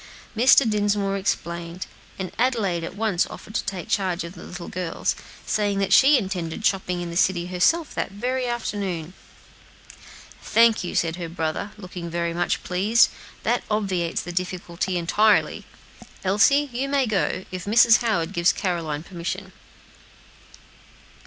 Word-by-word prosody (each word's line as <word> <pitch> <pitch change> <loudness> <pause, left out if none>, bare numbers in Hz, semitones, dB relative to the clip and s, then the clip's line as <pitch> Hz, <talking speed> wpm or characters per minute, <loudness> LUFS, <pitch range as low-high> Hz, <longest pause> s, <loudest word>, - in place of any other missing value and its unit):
Mr. 250 +2 +6
Dinsmore 205 -2 +1
explained, 170 -2 -3 0.3
and 190 -1 -4
Adelaide 215 -9 +1
at 165 - -6
once 205 -4 +1
offered 215 - -11
to - - -1
take 185 -4 -5
charge 185 -3 0
of 170 +1 -8
the 175 - -12
little 180 -1 -8
girls, 180 -2 -2 0.3
saying 205 -2 0
that 195 -1 +1
she 275 +2 +7
intended 190 -2 -3
shopping 190 -3 +1
a - - -4
little - - -3
in 170 - -5
the 170 - -3
city 175 -1 +2
herself 185 - +1
that - - -2
very 250 +5 -2
afternoon. 195 -8 -3 1.3
"Thank 230 -2 +4
you," 175 - -5
said 165 0 0
her 170 -2 -5
brother, 165 +4 -3
looking 180 -3 -7
very 170 0 -2
much 175 +1 -1
pleased; 205 +6 +3 0.3
"that - - +1
obviates 190 -6 -1
the 175 - -6
difficulty 180 0 -2
entirely. 205 +5 +2 0.6
Elsie, 210 +10 +4
you 265 +3 -2
may 275 -1 +2
go, 195 -3 -1
if 185 -1 -5
Mrs. 225 +2 +6
Howard 200 -7 -1
gives 170 -1 +3
Caroline 165 -6 -2
permission." 185 +2 -5
190 Hz, 150 wpm, -24 LUFS, 175-215 Hz, 1.3 s, she